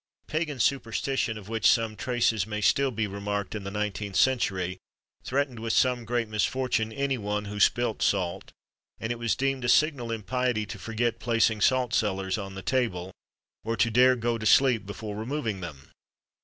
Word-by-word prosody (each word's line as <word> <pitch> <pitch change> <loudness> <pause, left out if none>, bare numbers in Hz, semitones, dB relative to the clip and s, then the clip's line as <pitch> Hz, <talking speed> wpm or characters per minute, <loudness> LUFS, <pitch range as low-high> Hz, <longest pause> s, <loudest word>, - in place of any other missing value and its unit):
Pagan 155 -3 -2
superstition, 125 -1 0
of 100 -2 -11
which 110 -1 +3
some 115 -2 +2
traces 115 -3 0
may 105 -1 -3
still 135 +6 +3
be 110 -3 -1
remarked 100 0 -3
in 105 -2 -5
the - - -3
19th 105 -1 -3
century, 95 -8 +1 0.4
threatened 135 -3 -1
with 115 0 -2
some 125 -2 +2
great 120 0 -1
misfortune 110 +2 0
any 135 +1 -1
one 105 0 -2
who 105 0 -6
spilt 120 +1 +2
salt; 90 -3 0 0.5
and 110 - -3
it 120 - -4
was 115 -5 +1
deemed 135 -1 -1
a 125 - 0
signal 140 -6 +3
impiety 115 0 -1
to 105 0 -8
forget 115 +3 -1
placing 115 -2 +1
salt 125 +1 +2
cellars 95 -1 0
on 95 -1 -7
the 95 - -7
table, 95 -9 -1 0.5
or 115 +1 -2
to 115 +3 +2
dare 125 +3 +5
go 120 -1 -1
to 110 - -5
sleep 120 -4 +4
before 105 0 -6
removing 110 -3 -3
them. 70 -6 -9
115 Hz, 175 wpm, -27 LUFS, 105-125 Hz, 0.5 s, dare